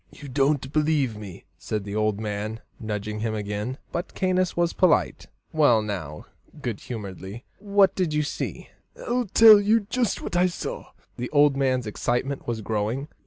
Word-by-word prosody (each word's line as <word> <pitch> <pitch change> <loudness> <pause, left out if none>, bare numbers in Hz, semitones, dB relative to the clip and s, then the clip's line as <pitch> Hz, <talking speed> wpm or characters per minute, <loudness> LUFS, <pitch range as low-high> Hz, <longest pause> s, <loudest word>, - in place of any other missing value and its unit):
"You 145 - -11
don't 135 0 +1
believe 150 -6 +1
me," 100 -4 -10
said 105 -2 -3
the 100 +1 -6
old 110 -1 0
man, 110 +1 -4 0.2
nudging 105 -1 -4
him 110 0 -2
again. 105 +4 -3
But 175 - -4
Caius 185 -2 0
was 170 -1 +1
polite. 185 -4 +2 0.3
"Well, 135 -9 +4
now" 85 -8 -5 0.3
good 120 -7 -4
humouredly 100 0 -7
"what 200 -1 +3
did 180 -5 -1
you 150 0 +1
see?" 145 - -5 0.3
"I'll 245 -1 -1
tell 215 +1 +8
you 220 +3 +3
jist 245 -4 0
what - - -5
I 180 +1 +4
saw." 180 - -5 0.3
(The 125 0 -4
old 145 -1 +4
man's 130 -3 +1
excitement 120 +5 -2
was 115 -2 -2
growing.) 110 +7 -2
130 Hz, 165 wpm, -25 LUFS, 105-170 Hz, 0.3 s, tell